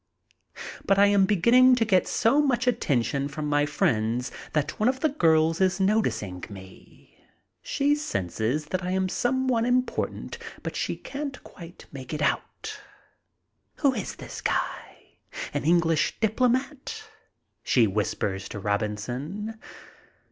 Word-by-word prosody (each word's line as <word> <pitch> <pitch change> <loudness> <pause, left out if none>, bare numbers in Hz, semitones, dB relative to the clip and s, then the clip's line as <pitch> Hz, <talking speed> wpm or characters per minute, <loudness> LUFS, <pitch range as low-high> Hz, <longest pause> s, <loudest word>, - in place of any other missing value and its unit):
But 195 - +2
I 200 - +7
am 200 -1 +4
beginning 245 +7 +5
to 230 -2 +1
get 190 -4 +3
so 255 +7 +3
much 255 -4 +1
attention 140 - +1
from 150 +1 -5
my 145 0 +2
friends 120 -4 0 0.2
that 150 0 -1
one 215 +3 +4
of 260 0 -2
the 315 - +3
girls 165 - +3
is 190 0 +2
noticing 115 - 0
me. 95 -2 -14 0.4
She 285 +1 +1
senses 125 - -2
that 185 +4 -3
I 180 - -2
am 190 0 +1
some 260 +5 0
one 235 -3 +2
important, 250 - -1 0.2
but - - -4
she - - -1
can't 280 0 -6
quite 170 -1 -12
make 135 +1 -6
it 150 - -4
out. 430 - -2 1.0
"Who 280 -3 +2
is 210 -7 -4
this - - -8
guy, - - -4 0.3
an - - -2
English 165 -1 +2
diplomat?" 255 - 0 0.6
she 120 -3 +3
whispers 100 -1 -2
to 105 - -6
Robinson. 120 - -3
185 Hz, 135 wpm, -26 LUFS, -, 1.0 s, I